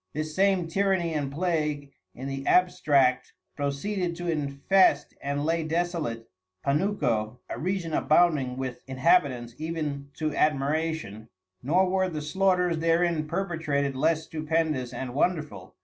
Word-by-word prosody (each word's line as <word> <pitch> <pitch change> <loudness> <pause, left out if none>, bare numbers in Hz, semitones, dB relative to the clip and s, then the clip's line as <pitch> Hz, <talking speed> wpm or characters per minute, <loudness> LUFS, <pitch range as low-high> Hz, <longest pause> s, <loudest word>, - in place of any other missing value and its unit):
This 155 +1 -3
same 190 -3 +2
Tyranny 185 -2 +1
and 145 -3 -2
Plague 150 -3 -1 0.2
in 130 +2 -6
the 135 0 -4
abstract 140 -8 +3 0.2
proceeded 170 +6 -2
to 175 0 -2
infest 145 +2 +2
and 140 +1 -2
lay 165 +1 +1
desolate 160 -8 -2 0.4
Panuco; 140 - 0
a - - -6
Region 180 -2 -2
abounding 150 -7 +2
with 130 -2 -4
Inhabitants 130 -3 +2
even 155 -3 -4
to 155 -1 -2
admiration, 150 -6 -1 0.3
nor 180 +8 +2
were 190 0 +1
the 155 -3 -5
slaughters 180 0 +1
therein 165 -1 +1
perpetrated 150 -7 -1
less 160 +3 +1
stupendous 155 -5 -1
and 130 -2 -5
wonderful. 150 +1 -2
155 Hz, 125 wpm, -27 LUFS, 140-175 Hz, 0.4 s, abstract